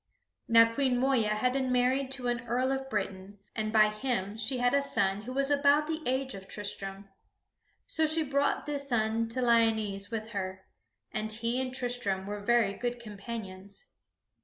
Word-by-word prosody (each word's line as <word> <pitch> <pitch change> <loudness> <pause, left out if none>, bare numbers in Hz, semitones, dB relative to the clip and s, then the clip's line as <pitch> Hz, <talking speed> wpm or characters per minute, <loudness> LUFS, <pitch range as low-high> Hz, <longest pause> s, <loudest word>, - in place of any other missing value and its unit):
Now 230 0 +6
Queen 260 -1 +2
Moeya 245 -5 +2
had 250 +4 +1
been 260 -1 0
married 255 +2 +2
to 255 -2 -4
an 240 -1 -2
Earl 255 +3 +1
of 270 0 -3
Britain, 195 -2 -4 0.2
and 215 -1 -1
by 215 -1 +6
him 215 -3 -2
she 230 +4 -1
had 245 +1 +2
a 280 - +4
son 200 -7 +1
who 245 - -7
was 275 +2 +1
about 285 +1 +4
the 320 +1 -3
age 260 0 0
of 190 -1 -9
Tristram. 195 -1 -6 0.8
So 315 -1 +1
she 315 +1 +1
brought 280 0 0
this 280 -1 -2
son 225 -1 +1
to 250 +3 -2
Lyonesse 220 -4 +2
with 225 -1 -4
her, 190 -2 -4 0.5
and 215 0 -3
he 230 +3 -1
and 255 -1 -3
Tristram 245 -7 -2
were 205 +1 -4
very 220 -1 +2
good 245 +3 -3
companions. 205 - -8
235 Hz, 175 wpm, -30 LUFS, 210-260 Hz, 0.8 s, Now